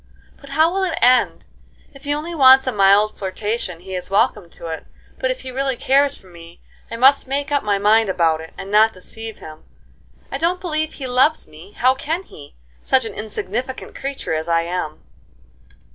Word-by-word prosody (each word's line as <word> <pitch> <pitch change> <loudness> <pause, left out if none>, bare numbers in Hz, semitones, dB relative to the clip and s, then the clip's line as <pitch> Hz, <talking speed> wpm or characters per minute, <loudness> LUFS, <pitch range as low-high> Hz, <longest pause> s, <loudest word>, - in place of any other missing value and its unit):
"But 280 - -14
how 320 +2 +4
will 390 - -1
it 355 -3 -1
end? 250 -1 +3 0.5
If 275 +1 -15
he 290 - 0
only 320 +3 -5
wants 265 -3 +7
a 255 - 0
mild 205 0 +3
flirtation 195 -2 -4
he 190 +1 -9
is 180 -1 -4
welcome 195 -2 +1
to 170 - -12
it; 160 - -6 0.3
but - - 0
if - - -3
he 260 - -7
really 270 0 -1
cares 275 +3 +2
for - - -21
me, 170 -1 -14 0.3
I - - -5
must 265 +3 +4
make 280 +2 -2
up 285 - +2
my 205 -1 0
mind 215 +1 +3
about 165 -3 +1
it, 160 - -11
and 195 - -8
not 220 +1 +5
deceive 225 +4 -8
him. 155 0 -12 0.7
I 275 - -3
don't 345 +3 0
believe 315 -3 -2
he 270 - -7
loves 260 +5 +2
me: 160 +6 -15
how 255 +2 +3
can 320 +7 -3
he? 145 - -14 0.3
such 260 -2 +2
an 220 - -6
insignificant 220 +5 -5
creature 275 -10 -4
as 160 +1 -2
I 165 0 +2
am." 170 -3 -4
225 Hz, 195 wpm, -20 LUFS, 185-275 Hz, 0.7 s, wants